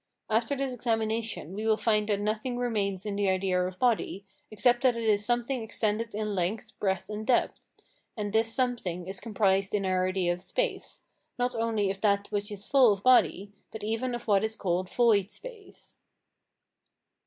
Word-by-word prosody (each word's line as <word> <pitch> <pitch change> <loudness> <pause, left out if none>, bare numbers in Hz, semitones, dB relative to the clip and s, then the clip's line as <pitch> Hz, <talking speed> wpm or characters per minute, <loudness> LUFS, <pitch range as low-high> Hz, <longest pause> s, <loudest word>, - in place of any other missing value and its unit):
After 230 +6 +1
this 270 -1 -2
examination 225 -6 -2
we 215 +3 -3
will 220 -1 +3
find 210 -2 +1
that 205 -1 +1
nothing 215 +4 -2
remains 210 -5 -1
in 205 -1 -3
the 200 -1 +1
idea 185 -1 +1
of 185 0 -4
body, 220 -4 0 0.2
except 240 +3 +2
that 255 -3 +3
it 230 - -3
is 210 -2 +2
something 240 +2 0
extended 220 0 -2
in 210 -1 -2
length, 190 +3 -2
breadth, 190 -3 -1
and 210 0 -5
depth; 240 +2 0 0.5
and 205 -1 -3
this 225 +1 +2
something 230 -9 -1
is 190 +1 -4
comprised 195 -3 +1
in 200 -1 0
our 185 0 +1
idea 185 -2 0
of 175 - -8
space, 465 - -3 0.3
not 245 0 0
only 225 -3 0
of 195 0 -8
that 200 -1 +1
which 205 +1 -2
is 205 0 -8
full 265 -5 +5
of 200 -1 -2
body, 205 -5 +4 0.2
but 220 - -8
even 225 +3 -1
of 240 - -8
what 200 -1 +3
is 220 0 -1
called 185 -2 -1
void 215 -5 +3
space. 450 - -12
215 Hz, 180 wpm, -28 LUFS, 195-235 Hz, 0.5 s, full